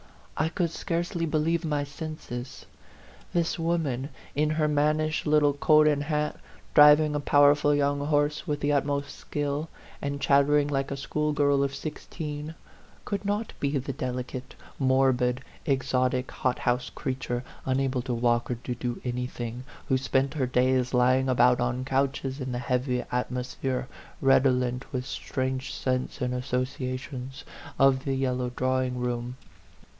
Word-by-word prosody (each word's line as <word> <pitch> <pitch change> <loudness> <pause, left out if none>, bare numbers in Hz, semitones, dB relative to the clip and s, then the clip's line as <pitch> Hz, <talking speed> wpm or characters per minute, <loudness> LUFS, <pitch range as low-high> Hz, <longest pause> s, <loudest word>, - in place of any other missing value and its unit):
I 155 +2 +1
could 170 -1 -1
scarcely 170 0 -2
believe 160 +2 +1
my 150 -3 0
senses. 140 -4 -7 0.7
This 170 0 0
woman, 155 -6 -1 0.2
in 150 +1 +1
her 155 0 +1
mannish 150 +1 +1
little 150 -1 +4
coat 155 +1 +5
and 145 -2 +2
hat, 150 -1 -1 0.4
driving 150 0 +7
a 150 - 0
powerful 145 +1 +4
young 145 0 +1
horse 150 +2 +1
with 145 -1 -1
the 145 - +1
ut 140 -1 +3
most 140 0 -3
skill, 145 +2 -3 0.3
and 140 0 -3
chattering 140 +1 +4
like 135 -1 -1
a 140 - -3
schoolgirl 145 -1 +1
of 140 0 -2
sixteen, 150 +1 -6 0.5
could 200 -1 -3
not 205 +2 -2
be 140 0 0
the 135 +1 -3
delicate, 125 0 -5 0.2
morbid, 130 -2 +2 0.3
exotic, 130 -2 +1
hothouse 125 -1 0
creature, 125 -3 -3 0.2
unable 130 -1 +1
to 125 0 -3
walk 120 0 +1
or 125 - 0
to 120 +1 -5
do 120 0 -4
anything, 125 -1 -4 0.3
who 130 - +4
spent 135 +1 +1
her 135 -5 0
days 125 0 +2
lying 130 +2 +3
about 125 -1 +4
on 125 +1 -1
couches 135 0 -1
in 130 0 -3
the 120 - -2
heavy 125 +1 0
atmosphere, 125 +1 -2 0.3
redolent 130 -1 +2
with 125 -2 -3
strange 130 0 -3
scents 130 -1 -2
and 125 0 0
associations, 130 +1 -3 0.3
of 135 -1 +4
the 135 -1 0
yellow 125 -2 0
drawing 130 0 0
room. 125 0 -3
135 Hz, 140 wpm, -27 LUFS, 125-150 Hz, 0.7 s, driving